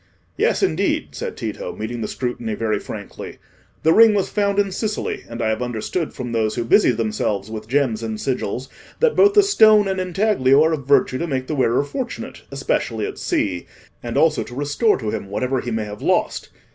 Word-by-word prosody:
"Yes, - - +1
indeed," 80 - 0
said - - -6
Tito, - - -5
meeting 115 +2 -5
the 105 - -2
scrutiny 120 -3 -3
very 110 0 -1
frankly. - - -8 0.5
"The 160 - +5
ring 225 -1 +7
was 195 - 0
found 200 -1 0
in 200 -1 +2
Sicily, 215 +2 -3
and 115 0 -4
I 110 - +1
have 110 +2 -1
understood 125 +8 -3
from 125 -2 -6
those 110 -2 0
who 120 -2 -2
busy - - +5
themselves 110 -3 -1
with 110 -1 -6
gems 125 -4 +1
and 110 -1 -4
sigils, 130 -1 -2 0.3
that 480 -1 +3
both 405 +1 +5
the 410 - +7
stone 215 - +5
and 190 -1 -1
intaglio 180 -7 +3
are 160 +1 +2
of 140 -4 -4
virtue 130 -2 +3
to 170 - -2
make 130 -4 -2
the 155 - -4
wearer 130 -2 +2
fortunate, 235 - -6
especially 120 -5 -1
at - - -6
sea, 90 -3 -1 0.3
and 120 -1 -4
also 160 -2 +3
to 120 - -8
restore 145 - +1
to 110 -4 -3
him 105 -3 -5
whatever 125 +5 -1
he 120 - -5
may 110 -2 -2
have 105 0 -8
lost. - - 0
130 Hz, 200 wpm, -21 LUFS, 110-185 Hz, 0.5 s, ring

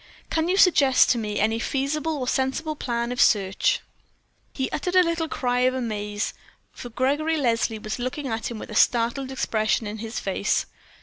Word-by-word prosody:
Can 325 +1 0
you 375 - +2
suggest 285 -9 +5
to 245 - +1
me 210 -2 -3
any 220 +2 +1
feasible 295 +5 -1
or 255 -2 -3
sensible 270 +5 -1
plan 235 -3 -2
of 250 - 0
search?" 205 - +2 0.7
Then 265 - -2
he - - -1
uttered 360 0 -2
a 365 - +7
little 335 -1 -1
cry 245 -5 -1
of 255 +1 +2
amaze, 210 -4 -3 0.4
for 245 - -9
Gregory 290 +7 0
Leslie 230 -5 0
was 215 +2 -5
looking 255 +3 -3
at 225 -2 -3
him 235 - -6
with 215 - -8
a - - -6
startled 240 +4 +2
expression 220 -4 0
in 210 +1 -5
his 225 +1 -4
face. 195 +1 0
250 Hz, 185 wpm, -24 LUFS, 225-290 Hz, 0.7 s, a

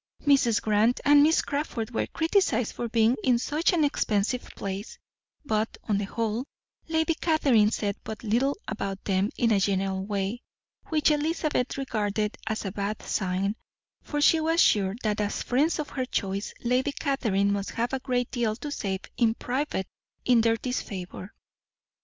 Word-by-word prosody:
Mrs. 270 -6 +4
Grant 215 +3 +3
and 290 0 +7
Miss 315 +3 +4
Crawford 280 -6 -3
were 230 - -1
criticized 320 - +1
for 235 - -4
being 230 +2 +3
in 250 -2 +4
such 300 +7 +1
an 340 -4 +2
expensive 235 -4 +1
place; 195 +2 -5 0.5
but 220 -3 -1
on 205 -2 0
the 205 - -2
whole, 225 +3 -2 0.4
Lady 320 0 +1
Catherine 275 -11 +3
said 205 -2 -1
but 220 0 -7
little 240 +6 +1
about 195 -1 -4
them 195 +1 +1
in 230 -1 +2
a 205 - +4
general 190 0 0
way, 200 +3 -2 0.5
which 310 -1 +3
Elizabeth 300 -3 0
regarded 215 -5 -1
as 220 -1 -2
a 195 - -2
bad 205 +1 -3
sign, 190 +1 -1 0.5
for 295 - -3
she 320 +2 +5
was 325 +1 +1
sure, 195 - +4
that 210 -1 0
as 205 0 -2
friends 285 +7 +1
of 305 -2 -4
her 260 -2 -2
choice, 200 -4 -2
Lady 255 +4 +1
Catherine 210 -10 +1
must 200 -1 -2
have 235 +3 -2
a 265 - 0
great 250 -2 -1
deal 235 -4 0
to 290 +5 -6
say 195 -8 -2 0.2
in 230 -2 +3
private 255 -6 -2 0.4
in 245 -2 +5
their 225 0 +2
disfavour. 195 -6 -5
230 Hz, 165 wpm, -27 LUFS, 205-275 Hz, 0.5 s, and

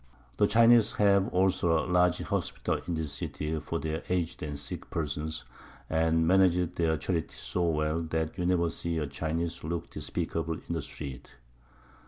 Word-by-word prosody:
The 105 - +4
Chinese 115 +1 +6
have 100 -2 +4
also 90 -3 +2
a 80 - 0
large 90 -1 +3
Hospital - - -2
in 85 - -1
this 80 -3 -3
City 75 +3 -3
for 80 +2 -3
their 80 +1 -3
Aged 90 -2 -1
and 75 -1 -4
Sick 70 - -7
Persons, 80 0 -3 0.5
and 80 0 +3
manage 90 -1 +4
their 80 -2 +1
Charity 80 +2 -2
so 85 -1 -1
well, 75 0 0
that 80 -1 -2
you 90 -1 -1
never 85 -2 +2
see 85 -1 -3
a 75 - 0
Chinese 80 +4 -3
look 85 +1 -4
despicable 80 0 -3
in 85 - -6
the 80 - -1
street. 70 -3 -8
80 Hz, 165 wpm, -29 LUFS, 80-90 Hz, 0.5 s, Chinese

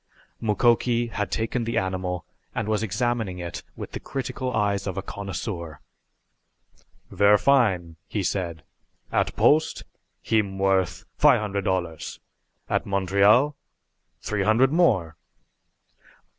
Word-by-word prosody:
Mukoki 120 +2 +2
had 105 -2 -2
taken 115 +2 -1
the 115 +1 -2
animal 90 -2 -2 0.3
and - - -2
was 110 0 +1
examining 110 -2 -1
it 85 -1 -6
with - - -7
the - - -5
critical 130 -1 -4
eyes 100 -3 0
of 95 - -4
a 95 - -2
connoisseur. 95 -5 -5 1.3
"Ver' 100 +1 +5
fine!" 100 -12 +2
he 105 - -2
said. 85 -5 -2 0.5
"At - - 0
Post 155 +2 +3 0.4
heem 100 -3 0
worth 95 -1 +1
fi' - - +6
hundred 100 -2 -3
dollars 85 -4 -2 0.5
at - - -1
Montreal 100 +8 +3 0.7
t'ree 105 -2 -1
hundred 115 +6 +4
more!" 95 - +2
100 Hz, 115 wpm, -25 LUFS, 95-115 Hz, 1.3 s, fi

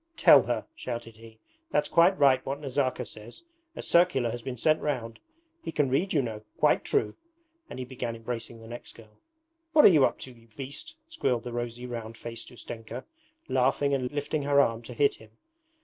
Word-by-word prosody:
'Tell - - +8
her,' - - -2
shouted 115 - -6
he. 115 0 -14 0.3
'That's 150 - +1
quite 175 +3 +4
right 135 -3 +4
what 140 +1 -4
Nazarka 135 -3 -1
says; 110 - -11 0.3
a - - -6
circular 170 -9 +3
has 120 - -5
been 125 +1 -5
sent 155 +6 +2
round. 120 -6 -3 0.4
He - - -4
can 145 -4 +1
read, 175 +9 +1
you 145 -4 +2
know. 110 -3 -5 0.2
Quite - - +3
true!' 105 - 0 0.6
And - - -8
he 130 - -4
began 125 -2 -5
embracing 115 0 -6
the 115 - -12
next 120 +1 -9
girl. 110 -2 -17 0.5
'What 305 - +7
are - - +11
you 155 -7 +5
up - - -1
to, 130 - -8
you 115 -1 -19
beast?' 140 - -7
squealed 130 - -1
the 120 - -6
rosy, 120 0 -4
round 115 -2 -6
faced 115 0 -8
Ustenka, 120 0 -8 0.4
laughing 135 +2 +2
and 130 -2 0
lifting 145 +1 -2
her 140 0 +3
arm 115 -4 +2
to 120 +1 -10
hit 140 +3 +2
him. 110 - -16
125 Hz, 195 wpm, -28 LUFS, 115-140 Hz, 0.6 s, are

